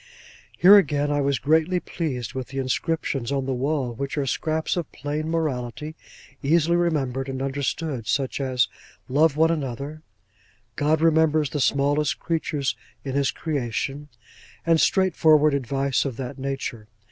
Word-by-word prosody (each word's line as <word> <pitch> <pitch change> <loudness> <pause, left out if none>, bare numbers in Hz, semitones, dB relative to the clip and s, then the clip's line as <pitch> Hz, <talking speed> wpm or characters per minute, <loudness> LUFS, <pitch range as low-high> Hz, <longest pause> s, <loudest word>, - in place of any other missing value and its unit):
Here 195 +4 +9
again, 145 -5 +2
I 145 0 +1
was 140 -1 +1
greatly 160 +4 +2
pleased 135 -10 -4
with 130 -1 -4
the 135 - -8
inscriptions 135 -1 -1
on 135 -1 0
the 135 - -1
wall, 130 -1 -1
which 140 +5 -4
were 140 - 0
scraps 155 +4 -1
of 175 -4 -3
plain 150 +3 -4
morality, 150 -2 -2 0.5
easily 165 +3 +3
remembered 140 -6 0
and 130 -1 -4
understood: 135 -2 -2
such 135 +6 -1
as 130 -2 +1 0.4
'Love 150 +2 +3
one 160 +1 +4
another'—'God 135 -1 -4
remembers 155 -3 +3
the 145 - -2
smallest 145 +2 +2
creature 160 -3 -2 0.4
in 135 - -4
his 140 0 +2
creation:' 140 0 -3 0.6
and 165 -1 +4
straightforward 155 -5 +4
advice 135 0 0
of 130 -5 -4
that 135 +1 -6
nature. 130 -5 -4
140 Hz, 140 wpm, -24 LUFS, 130-155 Hz, 0.6 s, Here